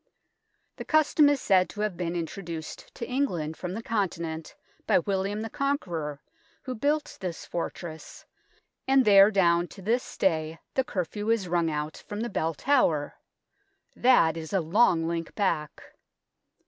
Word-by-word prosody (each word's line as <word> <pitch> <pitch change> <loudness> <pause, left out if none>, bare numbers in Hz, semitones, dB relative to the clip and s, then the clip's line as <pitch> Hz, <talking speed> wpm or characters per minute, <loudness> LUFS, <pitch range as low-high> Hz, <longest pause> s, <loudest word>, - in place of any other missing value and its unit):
The - - -5
custom 310 -1 +4
is 290 -1 +2
said 185 -5 +3
to 210 - -6
have 210 -4 -1
been 175 -1 -3
introduced 165 -1 -6
to 235 - -5
England 180 - -1
from 180 +2 -5
the 225 - -5
Conti 205 -7 -1
nent 160 -1 -6 0.3
by - - +5
William 195 +3 -1
the 225 - -4
Conqueror, 170 - -2 0.4
who 255 - -4
built 290 +5 -1
this 180 -3 -5
fortress, 170 -1 -6 0.6
and 265 -1 +4
there 200 -1 +8
down 175 -4 +3
to 195 - -13
this 235 +5 -1
day 160 -3 0 0.2
the 265 - +2
curfew 205 0 -3
is 225 -5 +1
rung 170 -1 +1
out 150 0 -3
from 210 +1 -4
the 240 - -2
Bell 165 -3 -1
Tower. 165 - +2 0.8
That 170 -11 +4
is 160 +1 -7
a 195 - +3
long 165 -1 +3
link 165 -1 -4
back. 155 -7 -1
185 Hz, 155 wpm, -27 LUFS, 165-225 Hz, 0.8 s, there